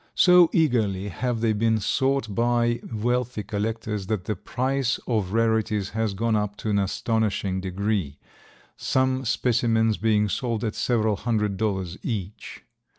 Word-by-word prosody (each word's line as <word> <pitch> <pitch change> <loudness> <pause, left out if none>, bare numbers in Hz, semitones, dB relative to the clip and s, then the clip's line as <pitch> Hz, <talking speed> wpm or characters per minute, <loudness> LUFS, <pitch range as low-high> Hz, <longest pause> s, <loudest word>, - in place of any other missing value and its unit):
So 180 -2 +6
eagerly 110 - +1
have 120 +1 -2
they 115 -2 +2
been 110 +1 +1
sought 130 +1 0
by 120 +1 +1
wealthy 120 0 -1
collectors 105 -1 -3
that 105 -4 -2
the 105 - -2
price 130 0 -1
of 105 -6 -1
rarities 110 -2 +1
has 110 -3 -1
gone 115 +2 0
up 105 -1 -1
to 110 - -3
an 100 - +2
astonishing 100 -1 -1
degree, 95 -5 -2 0.6
some 130 0 0
specimens 115 -2 +1
being 105 -1 +2
sold 115 +2 -2
at 110 -2 -1
several 110 -4 +1
hundred 105 -4 -1
dollars 95 -4 -2
each. 105 -4 -5
110 Hz, 140 wpm, -25 LUFS, 105-120 Hz, 0.6 s, So